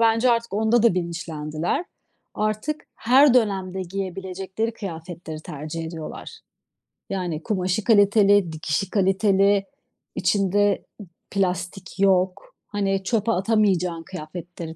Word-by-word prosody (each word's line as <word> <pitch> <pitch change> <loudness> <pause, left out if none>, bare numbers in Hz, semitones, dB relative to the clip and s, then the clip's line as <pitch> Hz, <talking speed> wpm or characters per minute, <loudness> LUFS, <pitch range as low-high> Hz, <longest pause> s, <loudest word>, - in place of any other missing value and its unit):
bence 230 +2 +4
artık 230 -2 0
onda 220 +3 +3
da 230 -6 +5
bilinçlendiler. 165 - -2 0.5
Artık 215 +8 -2
her 260 +3 +5
dönemde 190 -5 +1
giyebilecekleri 190 +3 -4
kıyafetleri 170 -5 -7
tercih 155 +2 -6
ediyorlar. 160 -1 -8 0.7
Yani 175 -5 -3
kumaşı 190 -1 -1
kaliteli, 205 -4 +5
dikişi 155 +4 -2
kaliteli, 195 0 +3 0.5
içinde 200 +2 +2 0.2
ı - - -9 0.2
plastik 185 -1 -2
yok. 190 0 +1
Hani, 195 -2 -1
çöpe 225 +2 +1
atamayacağın 185 -4 +1
kıyafetleri 170 -1 -8
190 Hz, 100 wpm, -23 LUFS, 175-210 Hz, 0.7 s, da